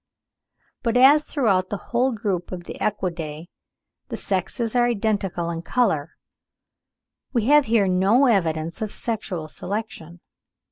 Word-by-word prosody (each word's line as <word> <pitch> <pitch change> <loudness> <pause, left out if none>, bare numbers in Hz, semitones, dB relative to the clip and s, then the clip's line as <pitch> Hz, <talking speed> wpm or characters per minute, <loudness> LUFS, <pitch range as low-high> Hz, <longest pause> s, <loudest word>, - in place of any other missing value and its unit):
But 235 -1 +1
as 285 +4 +6
throughout 195 -10 +1
the 205 - -2 0.2
whole 250 +3 +3
group 200 -6 -3
of 180 -2 -6
the - - -7
Equidae 170 -6 -3 0.6
the - - -5
sexes 205 +5 -2
are 240 -1 +4
identical 200 -6 -1
in 165 -1 -4
colour, 165 - 0 1.2
we 235 -4 +1
have 295 +2 +5
here 220 -4 +2
no 195 +9 +3
evidence 165 -8 0
of 215 - -2
sexual 200 -8 -4
selection. 175 -2 -6
200 Hz, 130 wpm, -23 LUFS, 175-235 Hz, 1.2 s, as